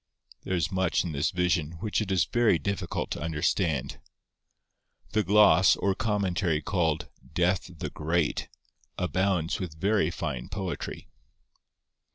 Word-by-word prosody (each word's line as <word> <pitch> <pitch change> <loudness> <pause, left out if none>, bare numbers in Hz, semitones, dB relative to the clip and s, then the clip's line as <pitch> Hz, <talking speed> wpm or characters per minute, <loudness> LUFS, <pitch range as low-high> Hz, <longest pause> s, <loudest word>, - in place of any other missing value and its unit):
There 95 - -1
is 85 +1 0
much 95 -2 +1
in 85 - -4
this 70 0 0
vision 90 -3 0
which 105 +6 -2
it 100 -3 -3
is 95 -3 +3
very 120 -7 +3
difficult 100 +6 -3
to - - -3
understand. 80 -2 -1 1.1
The 110 - +2
gloss, 100 -2 +6
or 100 - +1
commentary, 95 -6 0
called 80 -1 0 0.3
'Death 90 +1 +1
the - - -5
Great,' 80 +1 -1 0.5
abounds 90 -1 0
with 80 -4 -6
very 100 -3 +2
fine 75 -8 -4
poetry. 95 -3 -5
90 Hz, 130 wpm, -28 LUFS, 80-95 Hz, 1.1 s, gloss